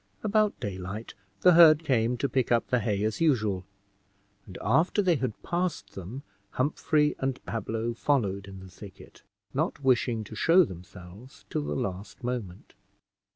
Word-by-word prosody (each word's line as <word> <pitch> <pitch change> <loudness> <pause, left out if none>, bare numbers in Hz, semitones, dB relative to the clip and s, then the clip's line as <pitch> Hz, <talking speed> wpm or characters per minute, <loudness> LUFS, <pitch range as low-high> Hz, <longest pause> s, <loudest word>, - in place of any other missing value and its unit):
About 215 0 +2
daylight, 100 +2 -6 0.3
the 180 - +7
herd 165 -2 +7
came 125 -4 +1
to 140 - 0
pick 130 -1 0
up 120 -1 +2
the 125 - +2
hay 105 -2 -1
as 110 +5 -2
usual, 110 - +1 0.8
and 95 - -9
after 160 - +2
they 180 -5 +3
had 130 -5 -3
passed 175 0 -2
them 100 +9 -8 0.3
Humphrey 150 +2 +1
and 135 -1 -2
Pablo 115 +1 -3
followed 100 -7 0
in 95 -1 -10
the 95 -1 -12
thicket, 95 0 -13 0.3
not - - -2
wishing 120 -3 +2
to 105 - -11
show 165 - +5
themselves 95 - -11
till - - -1
the 75 0 -3
last 95 - -5
moment. 115 -7 -5
115 Hz, 155 wpm, -28 LUFS, 100-145 Hz, 0.8 s, the